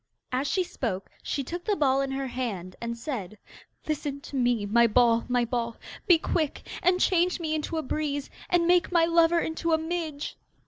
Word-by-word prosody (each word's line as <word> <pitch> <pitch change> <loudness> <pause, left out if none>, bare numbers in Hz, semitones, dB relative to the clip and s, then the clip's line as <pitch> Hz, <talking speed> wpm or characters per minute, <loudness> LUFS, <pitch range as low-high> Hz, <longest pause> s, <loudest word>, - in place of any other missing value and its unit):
As 260 +3 0
she 370 - +1
spoke 210 - -4
she 275 - -2
took 345 +6 -5
the 420 - +2
ball 275 -5 +3
in 275 - -1
her 270 0 -2
hand, 220 -8 -4
and 235 0 -3
said: 220 - -5 0.5
'Listen 290 -2 -2
to 285 - -9
me, 245 -4 +2
my 235 +3 +4
ball, 230 0 +4
my 245 -1 +2
ball. 235 -1 -2 0.3
Be 350 - +7
quick 320 -2 -2
and 360 +1 +3
change 360 -1 +2
me 315 -2 -2
into 315 +1 -2
a 315 - -1
breeze, 285 0 -2 0.2
And 350 -1 +3
make 355 +1 +3
my 340 -2 +4
lover 335 0 +4
into 325 0 -1
a - - +5
midge. 320 -3 -4
285 Hz, 190 wpm, -27 LUFS, 240-335 Hz, 0.5 s, Be